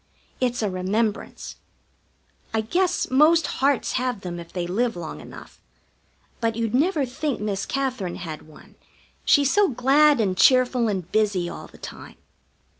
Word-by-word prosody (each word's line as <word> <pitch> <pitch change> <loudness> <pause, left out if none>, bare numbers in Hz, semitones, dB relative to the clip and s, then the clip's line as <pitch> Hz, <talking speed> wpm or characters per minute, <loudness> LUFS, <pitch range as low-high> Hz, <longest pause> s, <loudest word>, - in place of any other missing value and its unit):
It's 245 -2 0
a 210 - +1
remembrance. 205 +4 -2 1.0
I 220 - +2
guess 350 - 0
most 310 +4 +5 0.2
hearts 275 0 +2
have 250 -5 -2
them 175 -1 -6
if 170 0 -11
they 180 -2 -3
live 225 +6 -1
long 170 -2 -7
enough. - - -13 0.8
But 230 -2 0
you'd 230 -1 -2
never 295 +2 +2
think 265 +2 -3
Miss 205 -2 -3
Katherine 255 -10 -2
had 155 -3 -8
one, 155 - -17 0.5
she's 285 -2 +4
so 410 -1 +4
glad 275 +3 +4
and 195 -4 +1
cheerful 250 +1 +4
and 190 -4 -3
busy 205 -5 +1
all - - -8
the - - -17
time. - - -10
235 Hz, 150 wpm, -24 LUFS, 190-270 Hz, 1.0 s, most